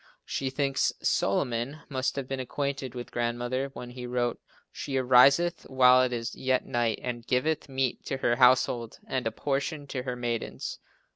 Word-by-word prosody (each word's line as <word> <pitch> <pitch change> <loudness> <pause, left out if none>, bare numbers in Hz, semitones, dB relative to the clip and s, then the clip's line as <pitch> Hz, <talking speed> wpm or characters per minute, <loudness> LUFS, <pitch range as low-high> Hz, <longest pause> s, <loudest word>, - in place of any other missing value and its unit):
She 135 - -2
thinks 135 0 +1
Solomon 120 +8 0
must 130 -2 -1
have 135 -2 -4
been 135 0 -3
acquainted 135 0 -3
with 120 -1 -7
Grandmother 120 +3 -1
when 120 0 -7
he 125 0 -7
wrote 120 -1 -1 0.3
"She 135 -2 -4
ariseth 135 +7 +4
while 130 -1 +6
it 130 -1 +1
is 115 -1 -3
yet 130 -1 0
night 120 -2 0
and 120 -2 -4
giveth 150 +4 0
meat 130 -2 -1
to 135 - -2
her 120 -2 +1
household 125 -2 +3
and 130 -3 -2
a - - -1
portion 145 +1 -2
to 130 - -3
her 125 -1 -4
maidens." 120 -2 -4
130 Hz, 165 wpm, -28 LUFS, 120-135 Hz, 0.3 s, while